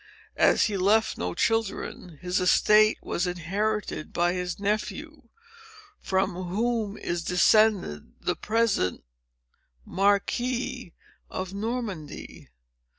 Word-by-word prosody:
"As -, -, +5 dB
he 210 Hz, -3 st, 0 dB
left 210 Hz, +4 st, +2 dB
no 90 Hz, 0 st, -3 dB
children, 220 Hz, -6 st, -2 dB
his 180 Hz, +1 st, 0 dB
estate 215 Hz, +4 st, +5 dB
was 180 Hz, -, -1 dB
inherited 190 Hz, +1 st, -2 dB
by 175 Hz, +1 st, +1 dB
his 180 Hz, 0 st, -3 dB
nephew, 235 Hz, +7 st, -3 dB, 0.7 s
from 190 Hz, -1 st, 0 dB
whom 215 Hz, +2 st, -1 dB
is 175 Hz, -1 st, -3 dB
descended 180 Hz, -, +2 dB
the -, -, -1 dB
present 215 Hz, -, 0 dB, 0.8 s
Marquis 240 Hz, +3 st, 0 dB, 0.4 s
of 185 Hz, 0 st, -5 dB
Normandy. 205 Hz, -7 st, -5 dB
200 Hz, 95 wpm, -26 LUFS, 180-225 Hz, 0.8 s, As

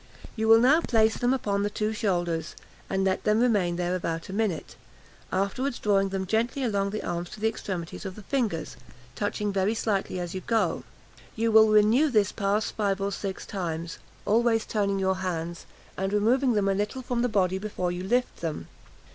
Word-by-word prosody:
You 220 Hz, 0 st, -1 dB
will 225 Hz, 0 st, +8 dB
now 275 Hz, +8 st, +5 dB
place 220 Hz, -5 st, +3 dB
them 245 Hz, 0 st, +1 dB
upon 205 Hz, -6 st, 0 dB
the 205 Hz, -, 0 dB
two 215 Hz, +1 st, -2 dB
shoulders, 175 Hz, -6 st, -1 dB, 0.3 s
and 190 Hz, 0 st, 0 dB
let 190 Hz, -1 st, 0 dB
them 210 Hz, +1 st, +3 dB
remain 205 Hz, -8 st, +2 dB
there 175 Hz, 0 st, -1 dB
about 165 Hz, -1 st, -3 dB
a -, -, -5 dB
minute; 205 Hz, -6 st, -2 dB, 0.6 s
afterwards 200 Hz, +8 st, -1 dB
drawing 195 Hz, -2 st, +2 dB
them 190 Hz, 0 st, -2 dB
gently 230 Hz, +7 st, 0 dB
along 200 Hz, -4 st, 0 dB
the 215 Hz, +2 st, -4 dB
arms 175 Hz, 0 st, -3 dB
to -, -, -10 dB
the 220 Hz, -, +1 dB
extremities 190 Hz, -6 st, -4 dB
of 190 Hz, -2 st, -6 dB
the 215 Hz, -, -11 dB
fingers, 205 Hz, -, -2 dB, 0.4 s
touching 205 Hz, +6 st, -2 dB
very 195 Hz, +3 st, +1 dB
slightly 200 Hz, -4 st, -1 dB
as 175 Hz, -1 st, -4 dB
you 185 Hz, -, -4 dB
go. 225 Hz, +2 st, 0 dB, 0.5 s
You 225 Hz, 0 st, +1 dB
will 220 Hz, 0 st, +7 dB
renew 215 Hz, +8 st, +5 dB
this 210 Hz, -6 st, +2 dB
pass 205 Hz, +1 st, 0 dB
five 200 Hz, -2 st, -1 dB
or 200 Hz, 0 st, -1 dB
six 195 Hz, -1 st, -5 dB
times, 170 Hz, -4 st, -4 dB, 0.3 s
always 225 Hz, +1 st, +2 dB
turning 200 Hz, -2 st, 0 dB
your 190 Hz, -1 st, +1 dB
hands, 170 Hz, -2 st, -4 dB, 0.3 s
and 195 Hz, +1 st, -2 dB
removing 240 Hz, +5 st, +3 dB
them 205 Hz, -2 st, +1 dB
a 195 Hz, -, +3 dB
little 210 Hz, +6 st, -2 dB
from 245 Hz, -1 st, -1 dB
the 245 Hz, -, +1 dB
body 190 Hz, -3 st, +1 dB
before 190 Hz, -3 st, -2 dB
you 175 Hz, +1 st, -4 dB
lift 245 Hz, +6 st, 0 dB
them. 155 Hz, -, -5 dB
205 Hz, 190 wpm, -27 LUFS, 185-220 Hz, 0.6 s, will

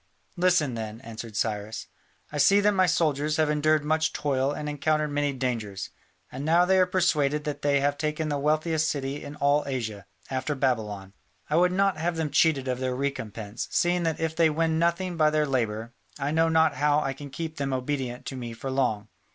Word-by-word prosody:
"Listen, 175 Hz, -7 st, +2 dB
then," 110 Hz, -1 st, -5 dB
answered 115 Hz, -2 st, -8 dB
Cyrus: 110 Hz, 0 st, -2 dB, 0.5 s
"I 150 Hz, -, -3 dB
see 200 Hz, +7 st, +6 dB
that 210 Hz, +1 st, +4 dB
my 185 Hz, -2 st, +3 dB
soldiers 150 Hz, -2 st, +1 dB
have 155 Hz, -1 st, +2 dB
endured 150 Hz, 0 st, +2 dB
much 155 Hz, +1 st, +1 dB
toil 135 Hz, -2 st, 0 dB
and 150 Hz, +1 st, -5 dB
encountered 150 Hz, +1 st, 0 dB
many 145 Hz, 0 st, 0 dB
dangers, 115 Hz, -7 st, -3 dB, 0.4 s
and 135 Hz, +2 st, -6 dB
now 170 Hz, +3 st, +4 dB
they 190 Hz, +1 st, +4 dB
are 185 Hz, -, +4 dB
persuaded 150 Hz, -6 st, +1 dB
that 145 Hz, -1 st, -4 dB
they 140 Hz, -1 st, +2 dB
have 145 Hz, 0 st, 0 dB
taken 155 Hz, +1 st, -1 dB
the 145 Hz, -1 st, -1 dB
wealthiest 155 Hz, +2 st, +1 dB
city 140 Hz, 0 st, -3 dB
in 145 Hz, 0 st, -8 dB
all 145 Hz, +1 st, +2 dB
Asia, 110 Hz, -7 st, -4 dB, 0.2 s
after 130 Hz, +3 st, -1 dB
Babylon. 105 Hz, -7 st, -1 dB, 0.4 s
I -, -, +3 dB
would 180 Hz, +1 st, +4 dB
not 195 Hz, -2 st, +2 dB
have 170 Hz, +2 st, -1 dB
them 160 Hz, -2 st, -2 dB
cheated 145 Hz, -5 st, +3 dB
of 125 Hz, -1 st, -1 dB
their 130 Hz, -1 st, -1 dB
recompense, 115 Hz, -5 st, -4 dB
seeing 175 Hz, 0 st, +1 dB
that 165 Hz, -2 st, -1 dB
if 160 Hz, -1 st, -1 dB
they 165 Hz, -1 st, +4 dB
win 160 Hz, +1 st, +1 dB
nothing 170 Hz, +1 st, 0 dB
by 155 Hz, -1 st, +4 dB
their 155 Hz, 0 st, +1 dB
labour, 115 Hz, -4 st, -2 dB, 0.2 s
I 140 Hz, +2 st, -2 dB
know 165 Hz, +1 st, +3 dB
not 160 Hz, -3 st, +3 dB
how 145 Hz, +1 st, +3 dB
I 135 Hz, -2 st, -2 dB
can 140 Hz, +1 st, -9 dB
keep 160 Hz, +3 st, -6 dB
them 140 Hz, -2 st, -2 dB
obedient 130 Hz, -1 st, -3 dB
to 135 Hz, -, -5 dB
me 120 Hz, -2 st, -6 dB
for 130 Hz, +4 st, -5 dB
long. 115 Hz, -6 st, 0 dB
145 Hz, 200 wpm, -26 LUFS, 130-160 Hz, 0.5 s, see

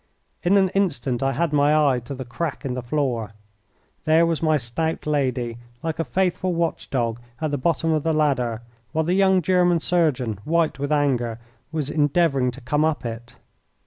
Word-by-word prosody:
In 190 Hz, +3 st, +3 dB
an 190 Hz, -1 st, +4 dB
instant 140 Hz, -11 st, 0 dB
I 135 Hz, 0 st, +1 dB
had 160 Hz, +3 st, 0 dB
my 145 Hz, +1 st, +4 dB, 0.2 s
eye 125 Hz, -, 0 dB
to 140 Hz, -, -6 dB
the 130 Hz, 0 st, -6 dB
crack 145 Hz, +4 st, -4 dB
in 130 Hz, -, -2 dB
the 125 Hz, -, -3 dB
floor. 120 Hz, -4 st, -2 dB, 0.7 s
There 160 Hz, +1 st, +5 dB
was 165 Hz, -2 st, -1 dB
my 155 Hz, -1 st, +3 dB
stout 155 Hz, +6 st, -3 dB
lady, 130 Hz, -5 st, -1 dB, 0.2 s
like 160 Hz, 0 st, -3 dB
a -, -, +2 dB
faithful 180 Hz, +4 st, 0 dB
watch 170 Hz, -1 st, -2 dB
dog, 115 Hz, -3 st, -1 dB, 0.2 s
at 155 Hz, -2 st, -1 dB
the 145 Hz, -, 0 dB
bottom 165 Hz, +3 st, +1 dB
of 155 Hz, -1 st, +2 dB
the 160 Hz, -, 0 dB
ladder, 125 Hz, -7 st, 0 dB, 0.3 s
while 160 Hz, 0 st, +1 dB
the 175 Hz, -, +1 dB
young 190 Hz, -1 st, +3 dB
German 180 Hz, -1 st, +3 dB
surgeon, 140 Hz, -, 0 dB
white 165 Hz, -2 st, +1 dB
with 145 Hz, +1 st, -2 dB
anger, 125 Hz, -6 st, +1 dB, 0.3 s
was 150 Hz, -3 st, -2 dB
endeavouring 145 Hz, -3 st, +2 dB
to 125 Hz, +2 st, -8 dB
come 145 Hz, +5 st, 0 dB
up 155 Hz, -5 st, 0 dB
it. 115 Hz, +1 st, -6 dB
150 Hz, 185 wpm, -23 LUFS, 125-165 Hz, 0.7 s, There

